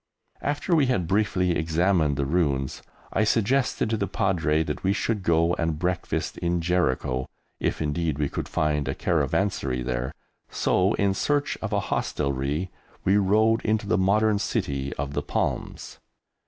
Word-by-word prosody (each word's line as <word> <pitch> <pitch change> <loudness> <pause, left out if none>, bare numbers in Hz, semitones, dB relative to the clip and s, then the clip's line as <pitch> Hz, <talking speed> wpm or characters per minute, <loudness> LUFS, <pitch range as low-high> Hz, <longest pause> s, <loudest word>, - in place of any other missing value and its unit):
After 145 +4 0
we 145 -4 +4
had 95 -9 +1
briefly 95 -2 +1
examined 80 -2 +1
the 70 - 0
ruins, 70 -4 0 0.3
I 110 - +2
suggested 115 +2 +1
to 110 - +1
the 100 - -1
Padre 80 -6 +1
that 75 -1 -5
we 95 +1 +2
should 110 0 -1
go 85 -1 +2
and 80 -2 0
breakfast 90 +2 -2
in 85 0 0
Jericho, 65 -7 0 0.3
if - - -1
indeed 75 0 -1
we 75 -1 0
could - - -5
find 75 -2 0
a 65 - -1
caravanserai 65 -11 0
there, 60 0 -2 0.4
so 95 +2 +2
in 100 -1 +2
search 145 +8 0
of - - -3
a - - +2
hostelry 70 +5 -1 0.3
we 95 +2 +4
rode 110 +3 +3
into 110 -1 0
the 105 - +1
modern 105 +2 +3
city 70 -7 -2
of 70 0 -4
the - - -1
Palms. - - -3
90 Hz, 155 wpm, -25 LUFS, 75-100 Hz, 0.4 s, we